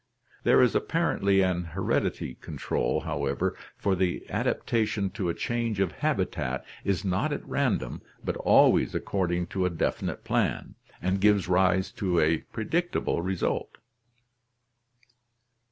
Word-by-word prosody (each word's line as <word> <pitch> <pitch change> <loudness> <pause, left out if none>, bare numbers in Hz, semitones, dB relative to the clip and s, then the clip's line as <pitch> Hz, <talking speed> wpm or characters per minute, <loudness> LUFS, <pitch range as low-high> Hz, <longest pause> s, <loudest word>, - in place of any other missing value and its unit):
There - - +6
is - - +3
apparently 100 -1 +2
an 90 -2 +1
heredity 85 +3 -1
control, - - -2
however, 70 0 -1 0.2
for 100 -2 +1
the 90 -1 -1
adapta 115 -2 0
tion 100 -3 -2
to 95 -3 -2
a 85 - -1
change 115 -3 -2
of 95 -4 +1
habitat 65 -3 -1 0.2
is 100 0 -1
not 90 -1 0
at - - -4
random - - -1 0.2
but - - -1
always - - +4
according 90 -3 -1
to 95 - 0
a 90 - +2
definite 85 - -2
plan, - - -1 0.3
and 95 +1 0
gives 105 -3 +4
rise 95 +1 +2
to 90 -4 +2
a 80 +1 +3
predictable 165 - -1
result. 95 0 -2
95 Hz, 130 wpm, -27 LUFS, 85-100 Hz, 0.3 s, There